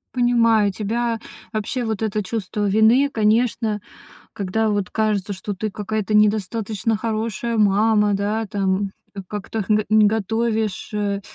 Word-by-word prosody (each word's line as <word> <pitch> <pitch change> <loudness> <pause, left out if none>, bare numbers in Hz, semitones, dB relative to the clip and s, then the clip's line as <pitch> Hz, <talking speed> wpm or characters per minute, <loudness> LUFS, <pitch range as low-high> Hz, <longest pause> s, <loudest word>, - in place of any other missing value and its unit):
Понимаю 230 -4 +3
тебя. 225 +3 -2 0.3
Вообще 220 +3 -2
вот 220 -1 -2
это 215 0 -1
чувство 205 0 -2
вины, 225 +7 +4
конечно, 220 -1 +1 0.5
когда 215 +2 -1
вот 205 -2 -1
кажется, 210 -2 0
что 200 +2 -5
ты 215 +3 -3
какая-то 215 +1 -3
недостаточно 215 +1 +1
хорошая 225 +1 -2
мама, 210 0 +3
да, 210 +2 -1
там. 195 0 -1 0.2
К 195 - -6
как-то 210 +1 -4
х 215 - -1 0.2
не 215 -1 +6
готовишь, 220 0 -1
э, 200 -1 -1
215 Hz, 130 wpm, -21 LUFS, 205-225 Hz, 0.5 s, не